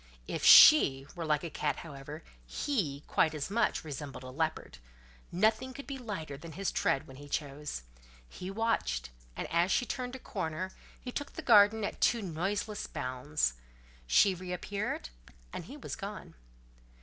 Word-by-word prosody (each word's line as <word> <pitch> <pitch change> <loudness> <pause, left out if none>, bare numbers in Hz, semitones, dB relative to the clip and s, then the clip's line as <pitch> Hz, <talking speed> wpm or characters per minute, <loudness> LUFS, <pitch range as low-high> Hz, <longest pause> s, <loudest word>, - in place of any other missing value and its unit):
If - - -4
she 135 - +9
were 170 -2 -5
like 150 +1 +1
a 170 - -5
cat, - - -1
however, 145 0 -9 0.2
he, 150 - -2
quite 160 -1 +2
as 150 +5 -4
much, 230 +1 +1
resembled 145 -3 -7
a 130 - -8
leopard: 160 +3 -3 0.5
nothing 220 +7 +1
could 280 - -8
be 275 -1 -6
lighter 165 - -5
than 160 +2 -10
his 195 +3 -2
tread 135 - +1
when 135 - -13
he 145 +1 -11
chose. 145 - -4 0.4
He 180 - -8
watched, 195 - -1 0.2
and - - -4
as 170 +2 +3
she 245 - +2
turned 250 +1 -4
a - - -7
corner, 165 -2 -4 0.3
he 250 - -7
took 290 +3 -5
the - - -7
garden 215 -1 +6
at - - -4
two 235 -3 +3
noiseless 200 +5 -2
bounds. 130 - -1 0.5
She 195 - +5
reappeared, 180 - -4 0.4
and - - -5
he - - -10
was - - -6
gone. - - -7
170 Hz, 160 wpm, -31 LUFS, 145-215 Hz, 0.5 s, she